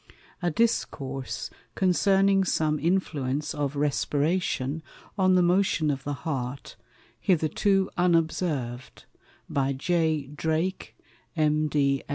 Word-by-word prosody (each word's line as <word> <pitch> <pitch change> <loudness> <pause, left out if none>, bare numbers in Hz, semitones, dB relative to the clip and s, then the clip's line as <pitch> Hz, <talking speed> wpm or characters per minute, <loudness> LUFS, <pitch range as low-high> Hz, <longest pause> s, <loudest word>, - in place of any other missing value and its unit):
_A 175 -1 0
Discourse 135 - -1 0.2
concerning 195 +1 +3
some 155 -4 0
Influence 150 -4 -1
of 145 -1 -2
Respiration 145 0 0 0.3
on 185 -2 +3
the 180 - +4
Motion 175 -4 +2
of 135 -1 -4
the 145 - -2
Heart, 135 -3 -4 0.4
hitherto 190 +3 +2
unobserved. 160 -8 0 0.4
By 140 -1 0
J. 160 +1 0
Drake, 160 +5 -2 0.4
M. 155 -1 +2
155 Hz, 95 wpm, -26 LUFS, 140-185 Hz, 0.4 s, the